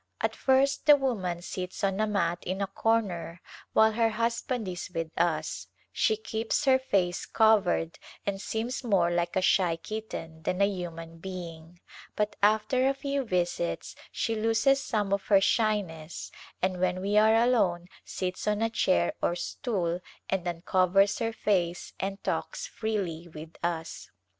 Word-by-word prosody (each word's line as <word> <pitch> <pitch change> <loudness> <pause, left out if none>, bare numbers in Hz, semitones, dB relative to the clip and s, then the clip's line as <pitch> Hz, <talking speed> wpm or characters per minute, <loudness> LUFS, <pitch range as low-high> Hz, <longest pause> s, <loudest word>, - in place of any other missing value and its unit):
At - - -1
first 275 +3 +2
the 295 - +10
woman 195 -11 -2
sits 185 +1 -5
on 195 0 +1
a 215 - +2
mat 175 -4 0
in 185 +2 -3
a 200 - +1
corner 195 -5 -1 0.3
while 220 0 +5
her 225 +1 +2
husband 230 +1 -1
is 180 -1 -5
with 165 -3 -4
us; 170 -1 -1 0.2
she 440 - +2
keeps 225 - -2
her 260 -1 +5
face 185 -8 0
covered 205 -7 +3 0.3
and 195 -1 -2
seems 230 +5 -3
more 190 -7 +2
like 175 0 -1
a 190 - +2
shy 180 -3 +3
kitten 165 -4 -7
than 180 +4 -2
a 200 - +5
human 165 -4 -5
being, 170 -2 -8 0.4
but 210 0 -1
after 215 +5 +3
a 275 - 0
{q^ 280 0 -2
visits 175 - -2 0.2
she 225 - -1
loses 225 +5 +2
some 210 -6 -1
of 200 - -1
her 200 -2 +6
shyness 195 -7 -1 0.3
and 185 -1 0
when 185 0 +1
we 200 +2 -1
are 215 +1 +6
alone 225 -8 +2 0.2
sits 185 +2 -4
on 210 +1 +1
a 225 - 0
chair 85 - +2
or 175 - +1
stool 180 - -2 0.3
and 185 -2 -1
uncovers 185 +4 +2
her 230 -1 0
face 180 -6 -1
and 195 +1 -4
talks - - -2
freely 200 - -3
with 160 0 -10
us. 165 -1 -3
195 Hz, 155 wpm, -28 LUFS, 175-225 Hz, 0.4 s, the